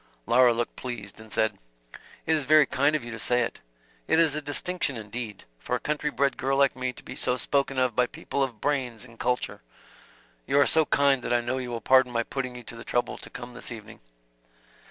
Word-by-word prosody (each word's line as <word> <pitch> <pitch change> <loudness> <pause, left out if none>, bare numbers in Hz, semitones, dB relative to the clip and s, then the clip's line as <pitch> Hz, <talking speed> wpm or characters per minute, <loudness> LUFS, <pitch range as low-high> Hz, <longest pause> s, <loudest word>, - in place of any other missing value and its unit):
Laura 125 0 +6
looked 120 0 -2
pleased, 115 -5 -6
and 110 -1 -13
said: 110 -3 +1 0.7
"It 160 - +3
is 150 - 0
very 155 +1 +7
kind 140 +3 +2
of 150 - -1
you 120 - -7
to 115 - -6
say 125 +2 +2
it. - - -4 0.5
It - - +3
is 160 -3 +4
a 155 - -2
distinction 145 -1 -2
indeed, 110 -1 -6 0.2
for - - -2
a - - -1
country 150 0 -1
bred 140 -1 0
girl 135 +1 0
like 140 -1 +4
me 130 -1 -2
to - - -14
be - - -8
so 125 0 +1
spoken 140 +1 0
of 130 -3 +2
by 125 -1 +3
people 140 - -4
of 125 -5 -1
brains 130 -5 -1
and 115 -2 -16
culture. 125 0 -1 0.9
You 140 - +3
are 145 - +6
so 160 -1 +3
kind 140 -2 +3
that 120 - -1
I 120 - +3
know 125 +2 -2
you 125 -1 -4
will 120 -1 -4
pardon 130 +1 +5
my 115 -1 0
putting 130 0 -4
you 120 - -8
to 120 - -8
the 115 - -9
trouble 120 0 -1
to - - -9
come 120 0 -8
this 125 - -5
evening." 110 -1 -9
125 Hz, 230 wpm, -27 LUFS, 120-140 Hz, 0.9 s, very